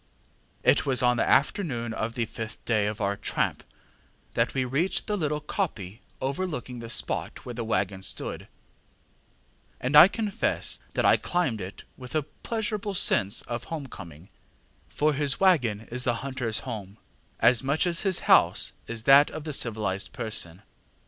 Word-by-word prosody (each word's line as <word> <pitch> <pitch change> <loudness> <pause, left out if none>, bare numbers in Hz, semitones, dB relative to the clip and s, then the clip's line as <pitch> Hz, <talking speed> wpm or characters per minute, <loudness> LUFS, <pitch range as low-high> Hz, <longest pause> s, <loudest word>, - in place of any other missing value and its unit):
ŌĆ£It - - +5
was 130 -1 +1
on 125 0 +3
the - - +1
afternoon 130 - +1
of 110 +1 -3
the 120 - 0
fifth 110 0 -8
day 110 -3 +2
of 105 +1 -4
our 100 0 0
tramp - - -1 0.7
that - - 0
we 130 -1 +1
reached 140 +9 0
the 210 - -1
little 150 -5 -1
koppie 115 - -3 0.2
overlooking 135 -3 -3
the 115 -1 -8
spot 120 - -3
where 125 - -5
the 120 0 -4
waggon 100 -4 -1
stood, - - -5 1.3
and 130 +4 -1
I 150 +4 +11
confess 215 +1 -2 0.2
that - - +1
I - - +6
climbed 150 - -1
it 95 +2 -8
with 125 +2 -9
a 155 - +2
pleasurable 210 - -4
sense 100 - +3
of 120 0 -5
home 155 -4 -5
coming, 85 - -11 0.6
for 150 +1 +1
his 140 -1 -1
waggon 125 - +3
is 125 +1 -1
the 120 -2 +1
hunterŌĆÖs 125 -3 -3
home, 105 -5 -7 0.4
as 120 +1 +5
much 140 +5 +1
as 175 -1 +1
his 190 -3 +1
house - - +4
is 115 -1 -3
that 140 +3 +7
of 155 - -7
the 155 -1 -4
civilized 105 -7 -1
person. 105 -4 -2
125 Hz, 160 wpm, -27 LUFS, 110-150 Hz, 1.3 s, I